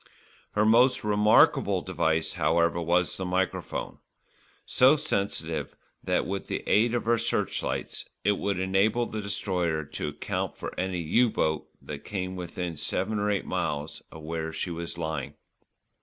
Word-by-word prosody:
Her 105 0 +3
most 125 +4 +5
remarkable 105 0 +4
device, 80 0 0
however, 85 +1 +2
was 85 +2 +2
the 95 - -3
microphone, 90 +1 -2 0.7
so 130 +4 +6
sensitive 85 - -2 0.3
that, - - +1
with 100 0 -4
the - - -3
aid 115 +3 +3
of 120 - -1
her 115 0 +3
searchlights - - -2 0.2
it 105 - +4
would 100 -2 -1
enable 95 +6 +2
the 110 -2 -4
Destroyer 90 -6 -1
to - - -4
account - - -3
for - - -5
any 90 -1 -2
"U" 115 +10 +3
boat 80 -7 0 0.2
that - - -7
came 95 -2 -4
within 90 -2 -4
seven 105 +8 -1
or 105 0 +1
eight 100 -2 0
miles 75 -4 -2
of 80 - -10
where 80 0 -3
she 85 +2 -3
was 85 0 -5
lying. 80 -4 -3
90 Hz, 150 wpm, -28 LUFS, 80-105 Hz, 0.7 s, so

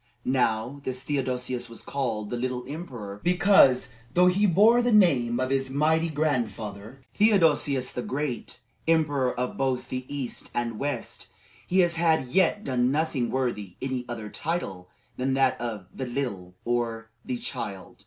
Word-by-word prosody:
Now, 125 +1 0
this 130 -1 -2
Theodosius 125 -3 -2
was 115 -2 -8
called 115 -7 -3
"the - - -1
Little" 125 0 -2 0.6
because, 175 -8 +5 0.3
though 180 +1 +6
he 190 +3 +4
bore 215 +7 +5
the 245 0 +1
name 130 - +4
of 130 +1 -1
his 135 -1 +1
mighty 160 +4 +2
grandfather, 120 -5 -3
Theodosius 160 - +3
the 125 - -4
Great, 135 -1 -4 0.3
emperor 145 -6 +2
of 125 - -2
both 130 -2 -1
the 130 +1 -5
East 140 -4 -5
and 115 -2 -2
West, 145 +1 -4 0.4
he 185 +1 +4
had 170 -2 +3
as - - -13
yet 190 +3 +3
done 125 -2 +1
nothing 140 -4 0
worthy 120 -8 -2
any 130 -1 -2
other 110 -3 -5
title 100 - -4 0.3
than 130 +1 0
that 130 -2 +2
of 110 -5 -4
"the 130 - -4
Little," 100 -9 -4
or 115 -2 -2
"the 125 - -3
Child." 95 -5 -6
130 Hz, 150 wpm, -26 LUFS, 120-155 Hz, 0.6 s, though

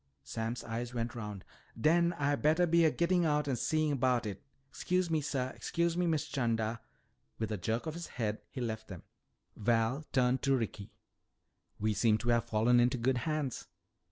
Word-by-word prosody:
Sam's 115 - -4
eyes 120 +1 -4
went 115 -1 -2
round. 105 -4 -6 0.3
"Den 170 +6 +3
Ah 145 0 +2
bettah 155 +5 +3
be 170 0 +4
a - - +6
gittin' 175 +1 +2
out 150 -2 +1
an' 135 - +1
see 155 +4 +1
'bout 125 -3 +1
it. 100 -2 -5 0.3
'Scuse 180 -1 0
me, 160 -1 +2
suh. 130 -3 -2
'Scuse 170 0 0
me, 175 0 +1
Miss 160 -3 +1
'Chanda." 115 -4 -1 0.6
With 110 - -3
a 105 - -1
jerk 110 - -1
of 160 - -3
his 170 +1 -6
head 110 -3 -3
he 130 - -6
left 110 -2 -3
them. 90 -4 -9 0.5
Val 115 +6 +1
turned 125 -1 +2
to 135 -1 +3
Ricky. 105 -4 -4 0.9
"We 110 +1 +1
seem 105 +1 +3
to 120 +2 -3
have 120 -1 +3
fallen 115 +3 +3
into 125 +2 +3
good 125 +1 +1
hands." 150 -5 -2
125 Hz, 185 wpm, -32 LUFS, 115-155 Hz, 0.9 s, a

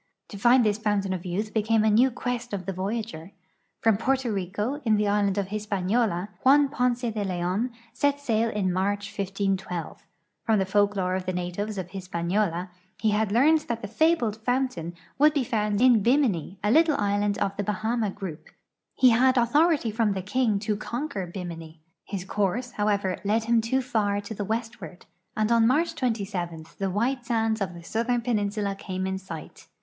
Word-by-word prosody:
J'o 200 - -8
find 240 +3 +5
this 210 0 +1
fountain 205 -3 0
of 180 0 -5
youth 210 +5 -3
became 220 0 +2
a 220 - +4
new 240 +5 +5
quest 245 -1 -4
of 190 -3 -3
the 195 - -3
voyager. 195 -2 -4 0.5
From 225 -3 +4
Porto 260 0 0
Pico, 205 +9 -3
in 220 -3 +3
the 210 0 +1
island 200 -1 +1
of 195 -1 -1
His[)aniola, 205 -1 -1
Juan 280 +2 +5
Ponce 250 -3 0
de 215 -1 -2
Leon 185 +5 -1 0.2
set 285 -1 +1
sail 230 -4 +1
in 195 -4 -1
March, 200 +2 -1
1512. 195 -3 -3 0.4
From 220 -2 +2
the 190 - +1
folklore 200 -1 +1
of 185 0 -3
the - - +1
natives 180 +4 -3
of 185 -2 -4
IIisi)aniola 180 0 -2 0.3
he 220 - +2
had 210 -1 +1
learned 295 +8 +5
that 230 -1 -3
the - - -3
fabled 240 -3 +2
fountain 230 -8 -2 0.2
would 300 +1 +5
be 280 - +2
found 210 -3 0
in 245 -3 +5
Bimini, 225 - +1
a 210 - +2
little 315 +1 +4
island 205 0 0
of 200 -1 -1
the 205 - -2
Bahama 215 +2 -1
group. 190 -5 -7 0.5
I - - +3
le 245 - +8
had 255 +2 +4
authority 285 +1 +3
from 220 -1 +1
the 190 -1 -4
king 220 +1 +1
to 210 0 -1
compier 210 - -4
Bimini. 165 -3 -7 0.3
His 190 -3 -5
course, 210 +6 -1
however, 205 -4 0
led 215 +3 +1
him 230 0 +3
too 260 +4 0
far 210 -5 0
to 205 +2 -7
the 205 -1 -4
westward, 220 -6 -5 0.3
and 215 +1 +1
on 230 -1 +5
March 315 +7 +2
27 200 - -3
the 195 -1 0
white 240 +7 0
sands 225 -2 0
of 185 -3 -2
the 170 - -10
southern 235 +6 0
peninsula 205 -3 -1
came 190 -1 -4
in 190 0 -2
sight. 170 -4 -10
210 Hz, 185 wpm, -26 LUFS, 190-235 Hz, 0.5 s, le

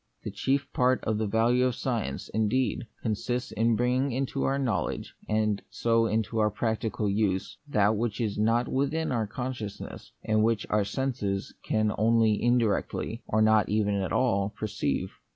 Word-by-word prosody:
A - - -3
chief 140 +1 0
part 130 +1 +2
of 110 -1 0
the 110 - 0
value 115 +4 +3
of 125 - -2
science, 110 - -2
indeed, 110 +3 0 0.2
consists 120 +3 -2
in 115 +1 +2
bringing 125 +4 +1
into 135 +2 -1
our 135 +1 +1
knowledge, 125 -7 -2 0.2
and 110 -1 +1
so 115 +2 +2
into 110 0 -1
our 105 0 +3
practical 110 0 -1
use, 100 -2 0
that 105 -5 +3
which 110 -1 -2
is 110 -4 -1
not 115 +3 +2
within 145 +4 0
our 115 -4 0
consciousness, 120 -3 -6
and 110 0 +2
which 110 -2 +1
our 105 -1 +3
senses 105 -6 -2
can 110 -1 +1
only 110 -1 +3
indirectly, 120 -1 0
or 110 - +2 0.3
even 105 -1 +1
not - - -1
at - - -5
all, 100 -6 +2
perceive. 110 0 -2
110 Hz, 160 wpm, -28 LUFS, 105-125 Hz, 0.3 s, value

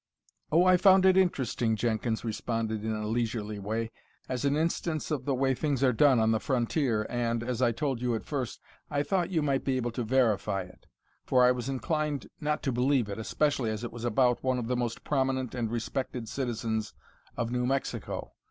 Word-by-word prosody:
"Oh, 170 +3 +5
I 185 0 +6
found 190 0 +6
it 190 -1 +6
interesting," 130 - +1
Jenkins 110 0 -1
responded 110 -1 -2
in 110 - -1
a 105 0 -3
leisurely 110 -2 -2
way, 110 +3 -3 0.4
"as 125 -2 -3
an 140 +1 +2
instance 160 -1 -1
of 135 -4 -2
the 140 - +1
way 135 +1 +2
things 140 0 -1
are 130 -2 +4
done 135 0 +5
on 110 0 +3
the 110 - +2
frontier 120 -3 0
and, 115 -1 -1
as 125 0 -2
I 120 -2 +4
told 125 +1 -2
you 125 -2 +1
at 110 - -5
first, 130 -5 -3 0.3
I 145 -1 0
thought 175 +3 0
you 165 -5 0
might 140 -2 +1
be 130 -1 0
able 120 -1 -1
to 120 +1 -3
verify 110 -5 +1
it. 90 - -17 0.4
For 125 -1 +4
I 125 - +6
was 125 +1 -3
inclined 150 +2 -2
not 150 -1 -1
to 135 - 0
believe 125 -2 +2
it, 100 - -5
especially 135 +1 0
as 110 +1 -3
it 120 - -4
was 120 -1 -8
about 125 +1 +2
one 130 -1 +1
of 120 - -2
the 125 - 0
most 120 -2 -2
prominent 130 -3 0
and 120 -3 -2
respected 120 +1 -3
citizens 110 -3 -2 0.4
of 120 0 -1
New 125 0 0
Mexico. 135 +1 -3
125 Hz, 205 wpm, -29 LUFS, 115-140 Hz, 0.4 s, I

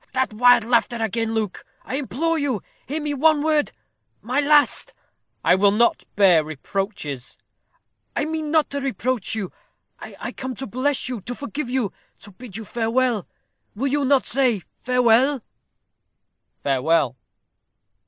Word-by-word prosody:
"That 260 -4 0
wild 245 +1 +6
laughter 240 +1 +2
again. 225 0 -1
Luke, 215 -4 -2 0.2
I - - -7
implore 315 +4 -1
you, 265 -9 -1 0.2
hear 300 +4 -2
me 295 -1 -2
one 300 +1 +3
word 310 -2 +2 0.5
my 255 +5 0
last 290 0 +3 0.2
" - - -51
"I - - +6
will 200 +2 +5
not 225 +4 +2
bear 185 -6 +5
reproaches." 155 - -5 0.8
"I - - 0
mean 315 -1 -3
not 310 -1 +2
to 280 0 -3
reproach 255 -6 -2
you. 200 -5 -4 0.5
I - - -7
come 260 -1 -5
to 265 - -5
bless 255 +5 -1
you 250 -5 -4
to 245 +6 -6
forgive 280 -1 -5
you 250 -6 -1 0.3
to 205 - -12
bid 215 0 -9
you 220 - -7
farewell. 235 -1 0 0.5
Will 265 +5 -1
you 290 0 +1
not 270 0 +3
say 250 -8 +1
farewell?" 250 +1 +3 1.2
"Farewell." 140 0 +2
245 Hz, 145 wpm, -23 LUFS, 210-280 Hz, 1.2 s, wild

